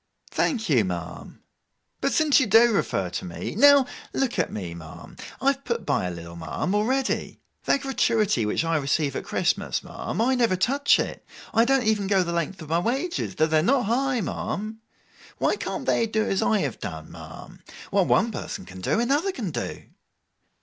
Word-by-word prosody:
'Thank 225 -7 0
you, 130 - +4
ma'am. 90 -3 -6 0.6
But, 275 - 0
since 310 -3 +4
you 260 - +1
do 225 +3 +6
refer 95 - 0
to 90 - -4
me, 85 - -5
now 280 +3 +6 0.3
look 260 -7 -1
at 170 - 0
me, 90 -5 -5
ma'am. 80 -2 -11 0.2
I 275 - +3
have 275 0 -8
put 235 -5 -3
by 140 -10 0
a - - -3
little, 85 0 -9
ma'am, 85 - -3
already. 255 +6 0 0.3
That 280 - +2
gratuity 225 - +1
which 105 +9 0
I 165 -1 +1
receive 140 0 0
at - - -4
Christmas, - - 0
ma'am: - - -5
I 245 +4 +3
never 235 -6 +2
touch 275 +10 +3
it. - - -3 0.3
I 225 +1 +4
don't 270 0 +3
even 210 -2 +1
go 195 -2 +3
the 170 -1 -3
length 170 +1 -2
of 155 - -11
my 165 +1 +2
wages, 270 - -2
though 155 - +3
they're 155 -1 +2
not 250 - +2
high, 250 +2 +1
ma'am. 215 +2 -4 0.6
Why - - +1
can't - - -4
they 230 - +2
do 220 0 0
as 195 - 0
I 215 -2 +2
have 135 -6 -3
done, 80 -6 -7
ma'am? - - -11 0.3
What - - +3
one - - +3
person - - -6
can 95 0 -10
do, 215 - +1
another 285 +11 +1
can 220 - -4
do. - - -5
210 Hz, 190 wpm, -25 LUFS, -, 0.6 s, do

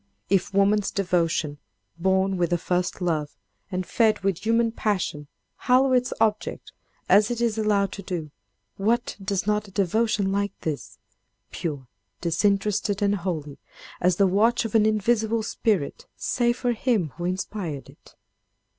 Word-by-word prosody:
If 195 0 +2
woman's 200 +1 +3
devotion, 170 -6 0 0.4
born 190 +2 +1
with 175 -1 0
a 175 - +3
first 180 +2 -1
love, 155 -4 -1 0.3
and 185 0 -2
fed 220 +4 +2
with 195 -3 0
human 230 +1 +2
passion, 185 -10 -2 0.3
hallow 260 +1 +3
its 250 0 +2
object, 215 -1 -1 0.4
as 205 +1 +5
it 240 -1 -2
is 235 -2 +1
allowed 205 -3 +1
to 200 - -7
do, 170 -5 -5 0.5
what 230 +5 0
does 195 -1 -1
not 210 0 0
a - - -14
devotion 200 +1 +1
like 200 +1 -2
this—pure, 150 -1 -7 0.3
disinterested 200 +3 +1
and 200 0 +3
holy 165 -7 -4 0.4
as 180 0 +3
the 200 - +4
watch 220 +6 +3
of 225 - -4
an 215 -1 +5
invisible 220 +1 +1
spirit—say 225 - -1
for 245 0 -1
him 225 - 0
who 175 - -4
inspired 180 -5 -3
it? - - -19
200 Hz, 140 wpm, -25 LUFS, 180-220 Hz, 0.5 s, as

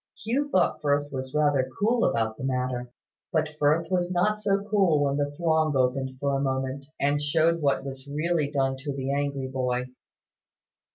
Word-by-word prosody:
Hugh 270 +7 -1
thought 185 -9 +2
Firth 145 -1 +1
was 130 0 -5
rather 145 -3 +2
cool 230 +3 +2
about 110 -1 0
the 125 - -9
matter. 125 -2 -2 0.4
But 155 -2 +1
Firth 155 +4 +2
was 180 -1 +1
not 210 +4 +1
so 200 0 0
cool 190 -8 +3
when 140 0 0
the 145 0 0
throng 160 -3 +2
opened 130 +1 0
for 140 0 0
a 135 - 0
moment, 135 0 -2
and 145 +1 +1
showed 165 +3 +2
what 140 -1 +1
was 135 0 -7
really 155 +1 0
done 135 -2 0
to 140 +1 -5
the 135 0 -2
angry 140 -1 -1
boy. 125 -1 -2
145 Hz, 175 wpm, -26 LUFS, 135-165 Hz, 0.4 s, cool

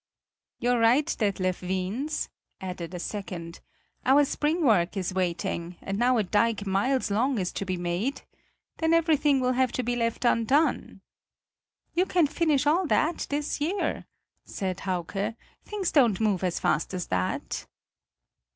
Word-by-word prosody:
"You're 245 -1 +1
right, 240 +6 +4
Detlev 190 -4 -1
Wiens," 190 +11 -2 0.3
added 180 -3 -6
a - - -4
second; 175 -4 -6 0.4
"our 280 +3 +5
spring 305 +4 0
work 200 -5 +3
is 185 -1 -2
waiting, 175 -1 -2
and 195 +1 -4
now 245 +1 +3
a 220 - +2
dike 210 +1 +1
miles 205 +5 +1
long 245 +5 +1
is 185 -3 -1
to 195 - -4
be 185 -1 -2
made? 180 +11 -2 0.5
then 320 0 +2
everything 305 -4 +3
will 255 0 +1
have 255 -1 +2
to 255 - -1
be 245 +1 -1
left 230 +1 -1
undone." 250 +7 +2 0.9
"You 365 +2 +2
can 350 -3 +3
finish 295 -1 +1
all 335 +5 +3
that 315 +3 +1
this 290 0 -2
year," 360 +7 -1 0.4
said 190 -1 -4
Hauke; 195 +4 -2 0.3
"things 405 -4 -2
don't 240 -9 +4
move 205 -4 +1
as 180 -2 0
fast 160 +5 0
as 180 - -3
that." 90 0 -2
230 Hz, 150 wpm, -27 LUFS, 185-285 Hz, 0.9 s, our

